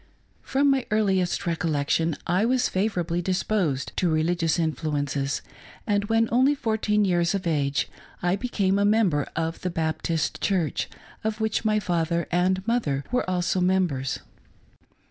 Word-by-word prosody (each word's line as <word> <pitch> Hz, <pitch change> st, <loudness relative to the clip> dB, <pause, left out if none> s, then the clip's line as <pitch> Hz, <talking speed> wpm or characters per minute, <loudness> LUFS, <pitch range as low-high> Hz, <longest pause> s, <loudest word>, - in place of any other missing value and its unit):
From 275 Hz, +1 st, +2 dB
my 270 Hz, -2 st, +2 dB
earliest 195 Hz, -3 st, +1 dB
recollection 160 Hz, -1 st, 0 dB
I 180 Hz, +4 st, +2 dB
was 250 Hz, +2 st, +2 dB
favorably 180 Hz, -4 st, -1 dB
disposed 180 Hz, -6 st, 0 dB
to 180 Hz, -, +2 dB
religious 165 Hz, +1 st, +1 dB
influences, 145 Hz, -4 st, -1 dB, 0.4 s
and 205 Hz, -2 st, +1 dB
when 225 Hz, +1 st, +2 dB
only 260 Hz, +5 st, +4 dB
fourteen 220 Hz, -4 st, +1 dB
years 175 Hz, 0 st, +2 dB
of 195 Hz, -, -3 dB
age 145 Hz, -4 st, 0 dB, 0.3 s
I 175 Hz, +1 st, +1 dB
became 200 Hz, -3 st, 0 dB
a -, -, +3 dB
member 205 Hz, -9 st, +2 dB
of 165 Hz, 0 st, -2 dB
the 185 Hz, -, -1 dB
Baptist 160 Hz, -2 st, -1 dB
Church, 180 Hz, -6 st, 0 dB, 0.3 s
of 220 Hz, 0 st, -2 dB
which 220 Hz, 0 st, 0 dB
my 215 Hz, -1 st, +2 dB
father 170 Hz, -3 st, 0 dB
and 185 Hz, +2 st, +1 dB
mother 155 Hz, -, 0 dB
were 250 Hz, -6 st, 0 dB
also 180 Hz, 0 st, 0 dB
members. 180 Hz, -8 st, +1 dB
180 Hz, 140 wpm, -25 LUFS, 160-210 Hz, 0.4 s, only